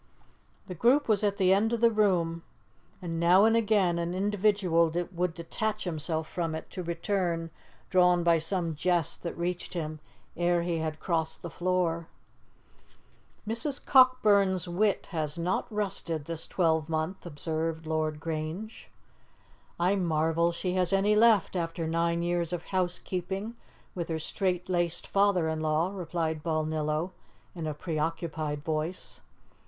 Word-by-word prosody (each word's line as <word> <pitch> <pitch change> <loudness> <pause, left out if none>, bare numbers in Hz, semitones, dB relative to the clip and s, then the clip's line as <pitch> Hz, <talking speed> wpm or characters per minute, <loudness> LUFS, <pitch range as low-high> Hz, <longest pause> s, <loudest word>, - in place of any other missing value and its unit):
The 185 - -6
group 245 - +3
was 215 -2 +2
at 200 -1 +1
the 190 -2 +4
end 215 +4 +2
of 235 - 0
the 230 0 +5
room, 180 -6 +1 0.6
and 165 -2 -3
now 180 +4 +6
and 225 0 +4
again 205 -6 +2
an 170 +1 -2
individual 195 -4 +2 0.2
would 175 -2 -1
detach 215 +6 -3
himself 160 -2 -3
from 165 -2 -2
it, 160 - -8
to 185 - -5
return, 170 -1 -1 0.4
drawn 180 -1 +4
by 170 -1 +4
some 170 0 -2
jest 175 0 0
that 170 - -5
reached 175 +1 -3
him 155 -2 -3 0.4
ere 175 0 +2
he 170 -1 -1
had 155 -1 -3
crossed 160 -3 -2
the 170 - -6
floor. 175 -2 0 1.4
"Mrs. 250 +6 -3
Cockburn's 205 -9 +4
wit 200 +4 0
has 155 -2 -2
not 180 +8 -1
rusted 185 -7 -3
this 165 0 -5
twelvemonth," 160 0 0
observed 160 0 -3
Lord 155 -1 -1
Grange. 160 +7 -5 0.9
"I 180 +3 +3
marvel 165 -1 +1
she 180 +1 -3
has 185 -1 +1
any 200 +2 +3
left 215 -4 +4
after 165 -1 -2
nine 170 +1 0
years 175 -1 0
of 175 -1 -3
housekeeping 185 +3 -2 0.4
with 170 -2 -4
her 160 - -1
straitlaced 180 0 -1
father 195 -4 +2
in 160 0 -1
law," 155 +3 +1
replied 165 -4 -2
Balnillo 155 +1 -1 0.4
in 165 -3 -5
a 150 - -3
preoccupied 155 -2 -3
voice. 160 +3 -4
170 Hz, 140 wpm, -29 LUFS, 160-190 Hz, 1.4 s, now